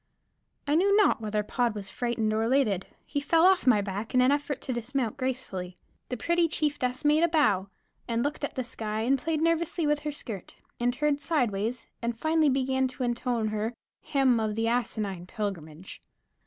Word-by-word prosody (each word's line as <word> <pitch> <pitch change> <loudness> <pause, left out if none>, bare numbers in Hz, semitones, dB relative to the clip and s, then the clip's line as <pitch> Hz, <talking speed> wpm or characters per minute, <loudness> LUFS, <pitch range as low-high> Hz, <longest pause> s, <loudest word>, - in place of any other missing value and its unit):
I 290 - 0
knew 395 +5 +4
not 420 - +4
whether 210 -1 -1
Pod 235 +1 0
was 195 -2 -6
frightened 235 -2 -1
or 220 - +1
elated; 225 -6 +1 0.2
he 285 - -2
fell 330 +3 +4
off 375 -5 +4
my 220 -5 +6
back 205 +4 -4
in 250 - +6
an 255 - +4
effort 290 0 -1
to 255 - -3
dismount 240 0 -2
gracefully. 240 -9 -4 0.3
The 250 - -3
pretty 340 +5 +2
chieftess 290 -4 -1
made 300 +2 +4
a 340 - +5
bow, 215 - +2 0.4
and 235 0 0
looked 290 +1 -3
at 285 - -3
the 255 - -1
sky, 220 -2 -4
and 265 +4 +2
played 315 +2 -1
nervously 330 0 +1
with 295 0 +2
her 300 0 -3
skirt, 220 -9 -7 0.2
and 240 +1 +2
turned 290 +2 0
side 285 -8 +1
ways, 220 +5 -3 0.2
and 235 -1 -2
finally 315 +2 +3
began 265 0 +1
to 255 0 -5
intone 240 -2 0
her 215 +2 -2 0.3
"Him 265 -4 +2
of 215 -1 -1
the 225 +1 0
Asinine 210 -6 -2
Pilgrimage." 180 -4 -6
250 Hz, 190 wpm, -28 LUFS, 215-290 Hz, 0.4 s, my